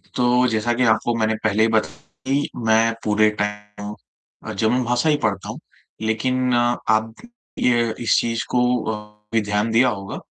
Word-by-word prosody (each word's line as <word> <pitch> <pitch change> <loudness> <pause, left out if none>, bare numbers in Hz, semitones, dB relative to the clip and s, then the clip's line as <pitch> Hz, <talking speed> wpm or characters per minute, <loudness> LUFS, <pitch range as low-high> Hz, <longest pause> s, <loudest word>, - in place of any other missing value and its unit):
तो 125 0 +3
जैसा 115 +1 0
कि 125 - 0
आपको 120 +2 -1
मैंने 110 0 +1
पहले 110 0 +2
ही 115 - +4
बताया 110 -1 0 0.3
कि 145 +1 0 0.2
मैं 110 +1 +3
पूरे 105 0 +3
टाइम 105 0 -5 0.6
जर्मन 115 +5 +1
भाषा 120 +5 +1
ही 150 - +3
पढ़ता 100 -3 -1
हूँ। - - -6 0.4
लेकिन 125 +3 0
आप 115 -2 +1 0.5
ये 120 -2 +2
इस 120 - +2
चीज़ 115 -1 -1
को 125 - +2 0.3
अ, 105 0 -8 0.2
भी 115 - +3
ध्यान 105 +2 -1
दिया 120 +3 +4
होगा, 100 -3 -5
110 Hz, 165 wpm, -21 LUFS, 105-120 Hz, 0.6 s, ही